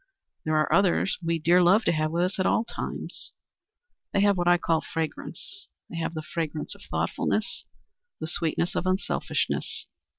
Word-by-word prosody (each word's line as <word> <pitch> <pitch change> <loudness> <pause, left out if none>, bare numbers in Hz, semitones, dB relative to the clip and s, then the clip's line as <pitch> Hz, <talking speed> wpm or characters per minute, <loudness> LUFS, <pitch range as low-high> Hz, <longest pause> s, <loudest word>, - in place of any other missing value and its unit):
There 155 0 +2
are 155 - +2
others 195 0 +3
we 165 0 +1
dear 170 +3 +5
love 190 +6 +5
to - - +4
have 155 -1 +1
with 170 +2 +1
us 185 +2 -1
at 185 - +3
all 220 - +3
times. - - -5 0.8
They 200 - +3
have 205 0 +5
what 175 -1 0
I 175 0 +6
call 165 -2 +1
fragrance. 165 - -5 0.2
They 170 - -5
have 165 0 -2
the 155 - -3
fragrance 155 -1 -3
of - - -15
thoughtfulness, - - -1 0.5
the - - -3
sweetness 165 +1 0
of 185 - -1
unselfishness. 185 +1 -1
170 Hz, 170 wpm, -27 LUFS, 160-185 Hz, 0.8 s, I